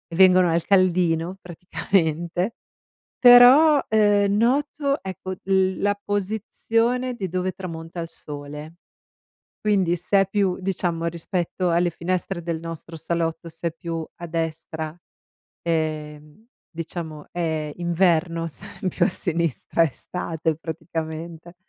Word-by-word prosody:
vengono 185 Hz, -1 st, +6 dB
al 165 Hz, 0 st, 0 dB
caldino 180 Hz, -2 st, +2 dB
praticamente, 175 Hz, +2 st, -1 dB, 0.6 s
però, 260 Hz, +5 st, +8 dB
uhm, 205 Hz, -2 st, +4 dB
noto 280 Hz, +4 st, +1 dB
ecco 190 Hz, 0 st, -6 dB
l 190 Hz, -1 st, +2 dB
la 205 Hz, 0 st, +1 dB
posizione 225 Hz, +5 st, -1 dB
di 195 Hz, -5 st, -3 dB
dove 185 Hz, +2 st, -1 dB
tramonta 165 Hz, -2 st, -7 dB
il 165 Hz, -, -4 dB
sole. 150 Hz, +2 st, -8 dB, 0.9 s
Quindi 195 Hz, -5 st, +2 dB
se 185 Hz, +3 st, +2 dB
è -, -, -1 dB
più 195 Hz, -2 st, +1 dB
diciamo, 175 Hz, -3 st, -1 dB
rispetto 175 Hz, +2 st, -2 dB
alle 170 Hz, +1 st, +2 dB
finestre 180 Hz, +2 st, -3 dB
del 165 Hz, -1 st, -3 dB
nostro 165 Hz, 0 st, -7 dB
salotto, 165 Hz, +1 st, -2 dB
se 165 Hz, +1 st, -3 dB
è 165 Hz, -, -8 dB
più 165 Hz, 0 st, -5 dB
a 170 Hz, -, -7 dB
destra, 160 Hz, -1 st, -4 dB, 0.6 s
ehm, 155 Hz, +1 st, -3 dB, 0.2 s
diciamo 160 Hz, -2 st, -6 dB
è 160 Hz, -3 st, -2 dB
inverno, 170 Hz, -1 st, +1 dB
se 145 Hz, -, -12 dB, 0.2 s
è 190 Hz, -, -1 dB
più -, -, +1 dB
a -, -, +3 dB
sinistra 170 Hz, -2 st, 0 dB
è -, -, +4 dB
estate 160 Hz, +2 st, -3 dB
praticamente, 160 Hz, +1 st, -6 dB
170 Hz, 120 wpm, -23 LUFS, 165-195 Hz, 0.9 s, però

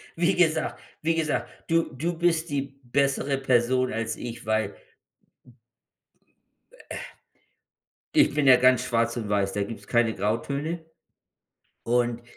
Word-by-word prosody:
Wie 175 Hz, +3 st, +2 dB
gesagt 160 Hz, -3 st, +1 dB, 0.2 s
wie 165 Hz, +1 st, +1 dB
gesagt, 155 Hz, -2 st, -1 dB, 0.2 s
du 165 Hz, -3 st, +1 dB
du 165 Hz, +6 st, -3 dB
bist 170 Hz, -1 st, +1 dB
die 140 Hz, -1 st, 0 dB, 0.2 s
bessere 140 Hz, +2 st, +1 dB
Person 130 Hz, -1 st, +2 dB
als 115 Hz, 0 st, -2 dB
ich, 120 Hz, -1 st, -7 dB
weil 110 Hz, -2 st, 0 dB, 2.2 s
äh, -, -, -4 dB, 1.2 s
ich 305 Hz, -, +4 dB
bin 150 Hz, -1 st, +1 dB
ja 130 Hz, -1 st, +9 dB
ganz 130 Hz, 0 st, +4 dB
schwarz 115 Hz, 0 st, 0 dB
und 110 Hz, -3 st, -4 dB
weiß, 100 Hz, -1 st, +1 dB
da 100 Hz, -, -1 dB
gibt's 110 Hz, +3 st, -7 dB
keine 120 Hz, -2 st, +2 dB
Grautöne. 140 Hz, -, -2 dB, 1.0 s
Und, 120 Hz, 0 st, +1 dB
130 Hz, 125 wpm, -26 LUFS, 115-155 Hz, 2.2 s, ja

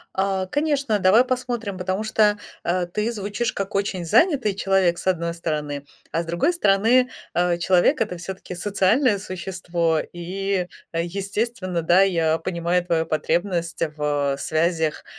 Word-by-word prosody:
А, 190 Hz, -1 st, 0 dB
конечно, 285 Hz, -4 st, 0 dB
давай 200 Hz, +7 st, +5 dB
посмотрим, 240 Hz, -6 st, -3 dB
потому 185 Hz, +4 st, -2 dB
что, 215 Hz, -1 st, +3 dB, 0.3 s
э, 175 Hz, 0 st, 0 dB
ты 210 Hz, +6 st, -2 dB
звучишь 205 Hz, +2 st, -2 dB
как 195 Hz, +1 st, -4 dB
очень 195 Hz, -3 st, -1 dB
занятый 250 Hz, -, +3 dB
человек, 195 Hz, -3 st, +2 dB
с -, -, -9 dB
одной 170 Hz, -2 st, +1 dB
стороны, 150 Hz, -4 st, -4 dB, 0.2 s
а 165 Hz, -, 0 dB
с -, -, -11 dB
другой 170 Hz, -, +1 dB
стороны, 240 Hz, -, +3 dB, 0.3 s
э, 175 Hz, 0 st, +2 dB
человек- 175 Hz, +1 st, +3 dB
это 180 Hz, -, -4 dB
всё-таки 185 Hz, +1 st, -7 dB
социальное 205 Hz, +5 st, +2 dB
существо, 180 Hz, -4 st, -2 dB
и 185 Hz, +2 st, -2 dB, 0.3 s
естественно, 190 Hz, +2 st, -2 dB
да, 175 Hz, +4 st, +4 dB
я 165 Hz, -4 st, +2 dB
понимаю 175 Hz, +1 st, -1 dB
твою 165 Hz, -2 st, 0 dB
потребность 170 Hz, +2 st, -1 dB
в 145 Hz, -2 st, 0 dB
связях, 160 Hz, 0 st, 0 dB
185 Hz, 140 wpm, -23 LUFS, 170-205 Hz, 0.3 s, давай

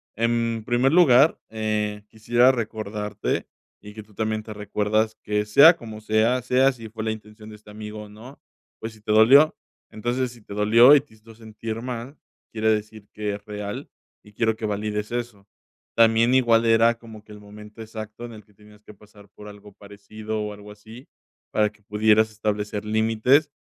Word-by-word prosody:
en 115 Hz, 0 st, -1 dB
primer 125 Hz, +4 st, +1 dB
lugar, 150 Hz, -4 st, +5 dB
eh, 105 Hz, -1 st, -3 dB
quisiera 120 Hz, +3 st, +3 dB
recordarte, 105 Hz, -4 st, -4 dB, 0.3 s
y 105 Hz, 0 st, -12 dB
que 110 Hz, 0 st, -10 dB
tú 105 Hz, 0 st, -23 dB
también 110 Hz, +1 st, -3 dB
te 110 Hz, -, -9 dB
recuerdas 105 Hz, +1 st, -1 dB
que 105 Hz, 0 st, -1 dB
sea 140 Hz, +11 st, +7 dB
como 110 Hz, -6 st, -10 dB
sea, 110 Hz, +4 st, +1 dB
sea 130 Hz, +2 st, +2 dB
si 115 Hz, -4 st, -11 dB
fue 110 Hz, 0 st, -7 dB
la 110 Hz, -, -1 dB
intención 105 Hz, 0 st, -11 dB
de 105 Hz, -, -11 dB
este 105 Hz, -, -19 dB
amigo 105 Hz, 0 st, -8 dB
o 105 Hz, -, -13 dB
no. 115 Hz, +7 st, -14 dB, 0.4 s
Pues 110 Hz, 0 st, -7 dB
si 110 Hz, -, -19 dB
te 105 Hz, -, -4 dB
dolió. 130 Hz, +8 st, +6 dB, 0.4 s
Entonces 120 Hz, +3 st, -2 dB
si 120 Hz, -1 st, -16 dB
te 105 Hz, -, -11 dB
dolió 115 Hz, +6 st, +6 dB
y 145 Hz, -, +4 dB
te 145 Hz, -, -24 dB
hizo 110 Hz, +1 st, -17 dB
sentir 110 Hz, 0 st, -7 dB
mal, 125 Hz, +3 st, -7 dB, 0.4 s
quiere 110 Hz, 0 st, 0 dB
decir 110 Hz, -1 st, -4 dB
que 105 Hz, -1 st, -3 dB
es 100 Hz, -, -12 dB
real, 105 Hz, -1 st, -7 dB, 0.3 s
y 105 Hz, -, -19 dB
quiero 110 Hz, +1 st, 0 dB
que 110 Hz, -, -6 dB
valides 105 Hz, +1 st, -3 dB
eso. 120 Hz, -5 st, -6 dB, 0.5 s
También 115 Hz, +1 st, +4 dB
igual 115 Hz, -3 st, +3 dB
era 115 Hz, +1 st, +4 dB
como 110 Hz, -2 st, -13 dB
que 110 Hz, -, -18 dB
el 105 Hz, -, -12 dB
momento 105 Hz, +1 st, -14 dB
exacto, 110 Hz, +1 st, -8 dB
en 120 Hz, -, -10 dB
el 110 Hz, -1 st, -12 dB
que 105 Hz, -, -27 dB
tenías 105 Hz, +1 st, -20 dB
que 105 Hz, -, -14 dB
pasar 100 Hz, 0 st, -19 dB
por 105 Hz, +1 st, -14 dB
algo 105 Hz, 0 st, -13 dB
parecido 105 Hz, +2 st, -7 dB
o 105 Hz, 0 st, -4 dB
algo 105 Hz, 0 st, -13 dB
así, 110 Hz, +5 st, -14 dB, 0.4 s
para 105 Hz, -1 st, +1 dB
que 105 Hz, -, -28 dB
pudieras 110 Hz, +1 st, +2 dB
establecer 105 Hz, -1 st, -3 dB
límites 115 Hz, +7 st, +2 dB
110 Hz, 190 wpm, -23 LUFS, 105-115 Hz, 0.5 s, sea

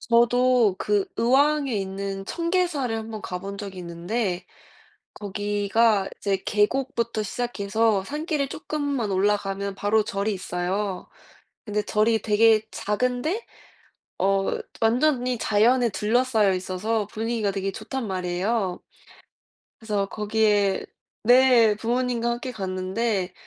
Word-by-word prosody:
저도 240 Hz, -2 st, +3 dB
그 415 Hz, -1 st, +1 dB
의왕에 275 Hz, +3 st, +3 dB
있는 195 Hz, 0 st, -3 dB
청계사를 335 Hz, -, -1 dB
1 220 Hz, 0 st, -6 dB
번 215 Hz, -1 st, -6 dB
가 180 Hz, -, -4 dB
본 200 Hz, +1 st, -7 dB
적이 195 Hz, -2 st, -7 dB
있는데 180 Hz, +2 st, -3 dB, 0.7 s
거기가 205 Hz, +1 st, +1 dB
이제 200 Hz, -1 st, 0 dB
계곡부터 235 Hz, +1 st, 0 dB
시작해서 220 Hz, -2 st, 0 dB
산길을 300 Hz, -, -2 dB
쪼끔만 285 Hz, -7 st, -3 dB
올라가면 200 Hz, 0 st, 0 dB
바로 210 Hz, +2 st, +2 dB
절이 205 Hz, +1 st, -1 dB
있어요. 185 Hz, +1 st, -3 dB, 0.6 s
근데 210 Hz, -1 st, -1 dB
절이 215 Hz, +1 st, +2 dB
되게 220 Hz, 0 st, +4 dB
작은데 250 Hz, -, -1 dB, 0.7 s
어 195 Hz, 0 st, +2 dB, 0.3 s
완전히 250 Hz, +2 st, +2 dB
자연에 235 Hz, +3 st, +3 dB
둘러싸여 220 Hz, -1 st, +2 dB
있어서 190 Hz, +4 st, -2 dB
분위기가 225 Hz, -1 st, -1 dB
되게 195 Hz, 0 st, -2 dB
좋단 265 Hz, +4 st, -5 dB
말이에요. 185 Hz, +1 st, -1 dB, 1.0 s
그래서 210 Hz, -3 st, -1 dB
거기에 210 Hz, -2 st, +1 dB, 0.4 s
네. 245 Hz, -2 st, +6 dB
부모님과 235 Hz, +1 st, -1 dB
함께 240 Hz, +2 st, -4 dB
갔는데 190 Hz, -1 st, -2 dB
215 Hz, 260 characters per minute, -24 LUFS, 195-245 Hz, 1.0 s, 네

